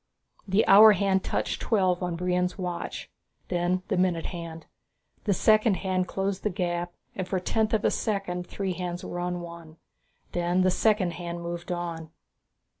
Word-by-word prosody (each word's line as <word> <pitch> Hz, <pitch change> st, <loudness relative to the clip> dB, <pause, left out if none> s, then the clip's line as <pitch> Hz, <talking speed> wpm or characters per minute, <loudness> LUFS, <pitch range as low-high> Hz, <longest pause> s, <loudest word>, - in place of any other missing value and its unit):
The 195 Hz, +3 st, +3 dB
hour 210 Hz, +2 st, +9 dB
hand 195 Hz, -1 st, +1 dB
touched -, -, -2 dB
twelve 185 Hz, -5 st, +2 dB
on 180 Hz, -2 st, -2 dB
Brion's 180 Hz, +1 st, 0 dB
watch, 180 Hz, -2 st, -5 dB, 0.4 s
then 180 Hz, +1 st, 0 dB
the -, -, 0 dB
minute 180 Hz, -3 st, +1 dB
hand. 165 Hz, -1 st, -7 dB, 0.6 s
The 205 Hz, -, +3 dB
second 215 Hz, +1 st, +4 dB
hand 185 Hz, -1 st, -1 dB
closed 195 Hz, 0 st, -2 dB
the 210 Hz, -, 0 dB
gap 175 Hz, -1 st, -2 dB, 0.2 s
and 185 Hz, -1 st, -3 dB
for 190 Hz, -, -1 dB
a -, -, 0 dB
tenth 220 Hz, +4 st, 0 dB
of 220 Hz, -3 st, +1 dB
a -, -, +4 dB
second 195 Hz, -4 st, -2 dB
the -, -, -27 dB
three 195 Hz, -2 st, -2 dB
hands 175 Hz, 0 st, -4 dB
were 175 Hz, 0 st, -3 dB
one. 170 Hz, -2 st, -8 dB, 0.5 s
Then 175 Hz, +1 st, +1 dB
the 185 Hz, 0 st, +3 dB
second 205 Hz, -2 st, +2 dB
hand 170 Hz, 0 st, -6 dB
moved 170 Hz, +1 st, -5 dB
on. 170 Hz, -2 st, -4 dB
180 Hz, 170 wpm, -27 LUFS, 175-195 Hz, 0.6 s, hour